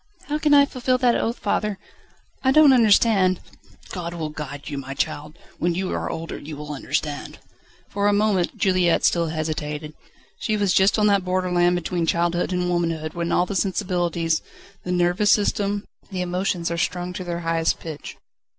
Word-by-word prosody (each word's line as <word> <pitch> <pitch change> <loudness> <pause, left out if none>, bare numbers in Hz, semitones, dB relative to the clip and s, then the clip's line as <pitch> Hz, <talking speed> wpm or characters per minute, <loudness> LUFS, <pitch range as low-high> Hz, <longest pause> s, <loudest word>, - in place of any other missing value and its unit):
"How 300 +1 0
can 305 -1 +1
I 280 0 +7
fulfil 255 -1 0
that 250 -2 +3
oath, 230 +2 -1
father? 210 0 -1 0.7
I 265 - +4
don't 295 -1 +7
understand 210 -5 +4 0.3
..." - - -23
"God 175 -2 -5
will 160 -2 -3
guide 145 -2 -7
you, 140 -2 -4
my 135 0 -7
child. 150 +1 -3 0.2
When 175 0 0
you 185 +1 -2
are - - -2
older 165 0 -5
you 150 0 -8
will 150 0 -6
understand." 145 +1 -3 0.5
For 205 0 0
a - - +4
moment 205 -3 +1
Juliette 185 -3 +2
still 170 -1 +2
hesitated. 155 -1 -4 0.5
She 215 -1 0
was 200 -3 +2
just 195 +3 +4
on 210 - +3
that 200 -2 +3
borderland 180 -1 +1
between 175 -1 -2
childhood 175 +2 +1
and 180 -1 0
womanhood 165 -3 -1
when 170 -1 -2
all 175 - +3
the 195 - -5
sensibilities, 175 -4 0 0.4
the 180 - -4
nervous 180 +3 +2
system, 205 -1 +1 0.2
the 185 -3 -3
emotions, 180 -1 -1
are 170 - -2
strung 180 +1 -2
to 185 - -5
their 175 -1 -4
highest 165 -1 0
pitch. 155 -3 -8
180 Hz, 180 wpm, -23 LUFS, 165-200 Hz, 0.7 s, I